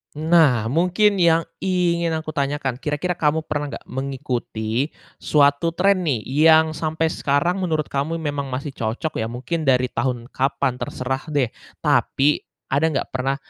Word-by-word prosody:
Nah, 150 -8 +3
mungkin 180 +6 +2
yang 165 -1 +4 0.2
ingin 170 -3 +1
aku 155 0 -4
tanyakan, 140 -3 -2
kira-kira 155 +5 -2
kamu 155 +1 +1
pernah 145 -1 -3
enggak - - -10
mengikuti 130 -2 -3 0.3
suatu 145 +3 +2
tren 185 -1 +2
nih, 120 -7 0
yang 160 +3 +4
sampai 160 +1 -1
sekarang 170 +7 0
menurut 160 -5 -1
kamu 140 +4 -1
memang 145 -4 -3
masih 135 +3 -4
cocok 125 +6 -3
ya, 110 - -1
mungkin 130 +7 -4
dari 125 -1 +3
tahun 125 -1 -2
kapan 130 -1 0
terserah 130 +3 -4
deh, 140 -6 0 0.3
tapi, 145 +2 +2 0.3
ada 145 +4 +3
nggak - - -1
pernah, 130 +1 -1
145 Hz, 145 wpm, -22 LUFS, 130-165 Hz, 0.3 s, yang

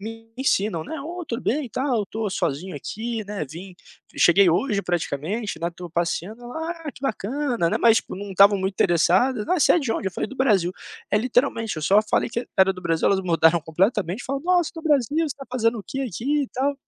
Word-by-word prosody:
me 225 +2 -9
ensinam, 210 -9 0
né. 320 - -6
'Ô, 345 +3 -6
tudo 235 -1 -4
bem, 275 0 -1
tal, 260 +3 -1
eu - - +1
estou 215 +1 -4
sozinho 175 +1 -2
aqui, 220 - -4
né, 205 -5 -4
vim 175 +6 -10 0.4
cheguei 185 +1 +5
hoje 200 +5 +1
praticamente, 175 - -3
né, 170 - 0
estou 175 0 -10
passeando'", 175 +7 -2
ela: 320 +8 -5 0.2
"Ah, - - -2
que - - -17
bacana, 245 -3 -1
né", - - 0
mas, 230 -1 +5
tipo, - - -8
não 200 +1 -7
estavam 200 +2 +6
muito 190 +1 -1
interessadas: 195 +7 +2
"Ah, 360 -3 +1
você - - +6
é - - +4
de 265 -8 -1
onde?", 195 - -2
eu - - -16
falei: - - -2
"Do 270 - -10
Brasil". 195 -9 +2 0.4
É 210 - +3
literalmente, 230 - 0
eu 155 - -5
só 195 +6 +5
falei 215 +2 0
que 235 - -2
e - - -11
era 190 0 +5
do 185 - -10
Brasil, 165 -2 0
elas 195 -1 +2
mudaram 165 -1 +3
completamente, 185 +5 0
falaram: 275 +1 -3
"Nossa, 355 -3 +3
do 325 - -7
Brasil. 295 -2 +2
Você 330 - +2
está 280 -2 -7
fazendo 230 -2 +1
o - - -6
que 270 - -5
aqui 270 - -1
e - - -11
tal?". 275 +3 -1
215 Hz, 230 wpm, -23 LUFS, 180-260 Hz, 0.4 s, estavam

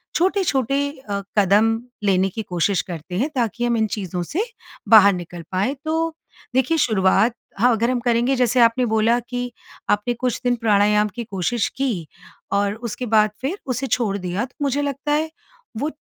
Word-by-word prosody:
छोटे-छोटे 285 - +1 0.3
अ, 200 0 -1 0.2
कदम 210 +3 +4 0.3
लेने 190 -1 +2
की 220 - -5
कोशिश 180 +1 0
करते 175 +1 -7
हैं 270 +8 0
ताकि 240 -1 0
हम 240 -1 +1
इन 220 -1 +2
चीज़ों 185 -3 -3
से 350 - -2 0.5
बाहर 205 -3 +8
निकल 175 -1 -7
पाएँ। 200 +9 0
तो, 325 +1 -1 0.4
देखिए 265 +5 +2
शुरुआत, 215 -3 +3 0.3
हाँ 245 +3 +5
अगर 230 +1 +1
हम 250 - 0
करेंगे 240 +2 +1
जैसे 250 0 +2
आपने 235 +2 +4
बोला 220 +2 +2
कि 245 +1 -5 0.4
आपने 210 +4 +1
कुछ 245 0 -2
दिन 245 0 +2
प्राणायाम 210 -1 +3
की 240 - -4
कोशिश 210 +1 -1
की, 230 - -1 0.4
और 200 0 +1
उसके 235 +2 -5
बाद 215 -2 +3
फिर 290 +9 -2
उसे 260 +1 -2
छोड़ 220 -4 0
दिया 185 +4 -2
तो 255 - -19
मुझे 285 0 +1
लगता 285 +1 -2
है 310 +2 +1 0.5
वो 295 +7 -1
230 Hz, 170 wpm, -21 LUFS, 200-255 Hz, 0.5 s, बाहर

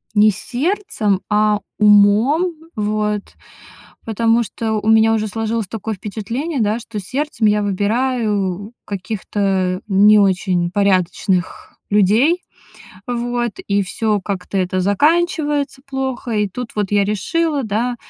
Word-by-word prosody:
не 210 +1 +6
сердцем, 245 - -1
а 210 0 +2 0.2
умом, 210 - +4 0.2
вот. 210 -1 -1 0.8
Потому 230 +1 +2
что 220 +1 -4
у 220 - -1
меня 220 0 +5
уже 215 -1 0
сложилось 225 -1 -2
такое 220 0 -4
впечатление, 230 - -4
да, 215 +2 +1
что 225 -2 -7
сердцем 255 +2 -1
я 210 0 +2
выбираю 205 -1 -1
каких-то 190 -2 -2
не 210 +2 +6
очень 185 -3 +1
порядочных 185 -1 0
людей, 220 - +3 0.7
вот, 240 -1 -2 0.2
и 200 0 +2
всё 210 +2 -1
как-то 195 0 -4
это 185 0 0
заканчивается 295 - +1
плохо. 265 -3 -3
И 210 -2 +1
тут 240 +5 -6
вот 210 -2 -1
я 205 -1 +3
решила, 290 - -1
да 235 +3 -1
215 Hz, 120 wpm, -18 LUFS, 200-240 Hz, 0.8 s, не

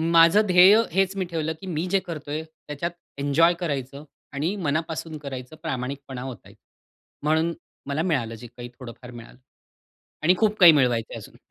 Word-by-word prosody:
माझं 165 +5 +7
ध्येय 185 +2 +7 0.2
हेच 195 +2 +1
मी 190 - -1
ठेवलं 160 -2 -3
की 190 - -8
मी 165 -1 -2
जे 195 - +4
करतोय 155 -4 -6
त्याच्यात 160 +1 -6 0.3
एन्जॉय 145 +5 +3
करायचं 140 -4 -4 0.3
आणि 155 +8 -1
मनापासून 160 -2 -3
करायचं, 135 -1 -8
प्रामाणिकपणा 135 -3 -5
ओतायचा. 130 -5 -11 0.6
म्हणून 160 +2 +1 0.3
मला 140 +2 -1
मिळालं 130 -10 -1
जे 120 +2 -11
काही 120 +1 -10
थोडंफार 125 0 -10
मिळालं. 120 0 -12 0.9
आणि 175 +4 +5
खूप 215 0 +1
काही 175 -3 +10
मिळवायचंय 125 -6 +1
अजून. - - -12
155 Hz, 150 wpm, -24 LUFS, 135-170 Hz, 0.9 s, काही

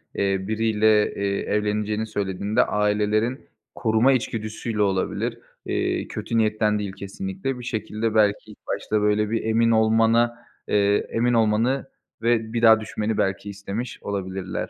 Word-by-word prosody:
eee, 95 -1 +1
biriyle, 110 -1 +2
eee, 100 0 -1
evleneceğini 105 +1 -1
söylediğinde 100 0 0
ailelerin 105 +4 0 0.3
koruma 115 +3 +3
içgüdüsüyle 110 -2 -3
olabilir. 95 -2 0 0.3
Eee, - - -1
kötü 115 - -3
niyetten 110 -1 +2
değil 100 -2 -4
kesinlikle. 135 - -5
Bir - - -8
şekilde 110 -1 -3
belki 105 0 +2
ilk 105 - -14
başta 105 -1 -1
böyle 105 0 +2
bir 115 +1 -1
emin 115 +1 +2
olmana 115 +1 +3 0.3
eee, 100 0 +2
emin 120 +1 +1
olmanı 115 +5 +2 0.3
ve 115 -1 +1
bir 115 - -1
daha 110 -1 +7
düşünmeni 110 0 -3
belki 95 +1 -1
istemiş 100 +4 -5
olabilirler. 95 -2 -4
110 Hz, 135 wpm, -24 LUFS, 105-115 Hz, 0.3 s, daha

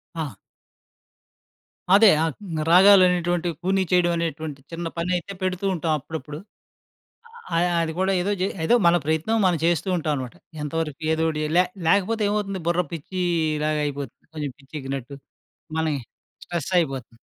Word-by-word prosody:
ఆ! 160 -3 -2 1.7
అదే 210 +2 +8
ఆహ్, 160 -2 0 0.2
గ్ - - -1
రాగాలనేటువంటివి 180 -2 +5
కూని 190 +1 +2
చేయడమనేటువంటి 165 -5 0
చిన్న 170 0 -5
పనయితే 180 +2 -1
పెడుతూ 185 +1 -1
ఉంటాం 165 -1 -1
అప్పుడప్పుడు. 150 +1 -7 1.2
ఆహ్, 175 +1 +3
అది 160 - -1
కూడా 190 +1 +2
ఏదో 200 +3 0
జే 190 - +2 0.2
ఏదో 240 - +5
మన 170 - +5
ప్రయత్నం 160 +9 +1
మనం 180 -2 +3
చేస్తూ 175 +3 +1
ఉంటామనమాట. 145 -5 -3 0.3
ఎంతవరకు 150 0 -3
ఏదోకటియలే 160 -1 -1
లే 180 - +7 0.2
లేకపోతే 205 +4 +2
ఏమవుతుంది 200 -3 -2
బుర్ర 175 +1 +3
పిచ్చీలాగయిపోతుంది. 155 -4 -2
కొంచెం 150 -3 -4
పిచ్చెక్కినట్టు 135 -2 -6 0.6
మనకి 155 -3 0 0.5
స్ట్రెసయిపోతుంది. 145 -8 -2
165 Hz, 120 wpm, -24 LUFS, 150-180 Hz, 1.7 s, అదే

